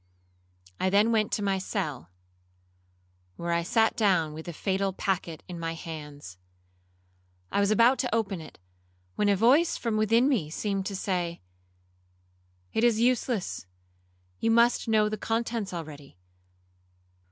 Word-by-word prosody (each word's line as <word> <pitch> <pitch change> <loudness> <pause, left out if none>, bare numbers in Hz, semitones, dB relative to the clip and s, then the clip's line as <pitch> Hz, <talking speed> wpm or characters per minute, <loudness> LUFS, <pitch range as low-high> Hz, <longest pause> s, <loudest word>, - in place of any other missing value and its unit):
I 185 - +2
then 205 +4 +4
went 215 -2 +1
to 205 - 0
my 195 -1 +1
cell, 155 - -4 1.3
where 170 - -3
I 170 0 +2
sat 225 +5 +2
down 185 -9 +2
with 160 +2 -9
the - - -3
fatal 195 +3 -1
packet 180 -4 -2
in 175 -2 -7
my 165 0 -3
hands. 150 - -9 1.1
I - - +1
was 200 0 +3
about 235 +4 +4
to 250 -4 0
open 195 -6 -1
it, 155 - -12 0.6
when 205 - +1
a 200 - +4
voice 265 - +4
from 230 -3 -1
within 225 +4 +3
me 215 - +1
seemed 195 +3 -2
to 200 - -4
say,—It 90 - -7
is 235 -2 +4
useless, 240 - 0 0.7
you 225 - +1
must 235 +1 +3
know 215 -1 +3
the 215 0 -3
contents 225 -2 -2
already. 150 - -8
195 Hz, 140 wpm, -28 LUFS, 155-225 Hz, 1.3 s, then